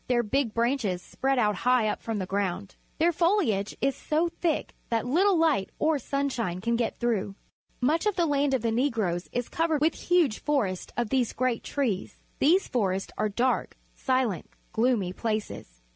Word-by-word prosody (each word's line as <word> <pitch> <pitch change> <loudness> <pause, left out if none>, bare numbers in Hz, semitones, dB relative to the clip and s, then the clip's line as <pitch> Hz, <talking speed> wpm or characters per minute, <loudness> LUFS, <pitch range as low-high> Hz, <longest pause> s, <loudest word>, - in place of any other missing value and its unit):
Their 240 -1 +2
big 240 +1 0
branches 230 -6 +1
spread 270 +8 -1
out 210 -5 +2
high 250 -1 +3
up - - -2
from 225 -2 -3
the 190 - -2
ground. 195 0 -2 0.2
Their 335 +2 +3
foliage 335 - +1
is 275 0 +1
so 315 +4 0
thick 335 -2 -2 0.2
that 230 0 0
little 360 +9 +3
light 310 -12 +2
or 310 -1 +2
sunshine 250 -9 -2
can 235 +4 0
get 230 -1 -1
through. 210 -5 -1 0.5
Much 315 +10 +2
of 415 - +1
the 345 - +2
land 285 -2 +2
of 245 - -2
the 230 - +1
Negroes 225 -8 0
is 245 -1 -2
covered 325 -2 0
with 310 +2 +3
huge 340 -11 +1
forests 215 -12 -1
of 240 -3 -1
these 255 -3 +1
great 255 -2 -1
trees. 240 -10 -2 0.2
These 350 +7 +4
forests 195 -5 -1
are 215 - 0
dark, 245 +5 0 0.2
silent, 255 -8 -1 0.2
gloomy 220 -6 +1
places. 215 - -4
245 Hz, 175 wpm, -27 LUFS, 210-290 Hz, 0.5 s, These